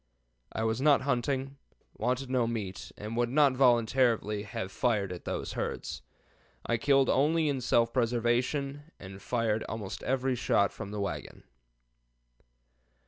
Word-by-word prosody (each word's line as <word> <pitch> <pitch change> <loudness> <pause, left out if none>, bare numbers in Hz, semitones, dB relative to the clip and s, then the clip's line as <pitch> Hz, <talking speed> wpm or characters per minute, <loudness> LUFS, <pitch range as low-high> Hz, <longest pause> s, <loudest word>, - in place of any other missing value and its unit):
I 110 - -2
was 110 +2 0
not 145 -1 +5
hunting, 135 +1 -1 0.4
wanted 130 +2 -1
no 125 -2 +1
meat, 105 -5 -5
and 105 +2 -6
would 120 0 +1
not 140 0 +4
voluntarily 120 -4 +3
have 100 -2 -5
fired 105 -6 0
at 90 - -8
these - - -3
herds. - - -4 0.6
I 120 - +1
killed 135 +2 +3
only 155 +4 +3
in 140 -3 -1
self 115 -1 +2
preservation 125 +5 0
and 95 0 -10
fired 115 -3 0
almost 105 -3 -5
every 130 0 0
shot 100 -4 +2
from 100 - -7
the 105 0 -5
wagon." 80 -8 -5
120 Hz, 140 wpm, -30 LUFS, 110-135 Hz, 0.6 s, not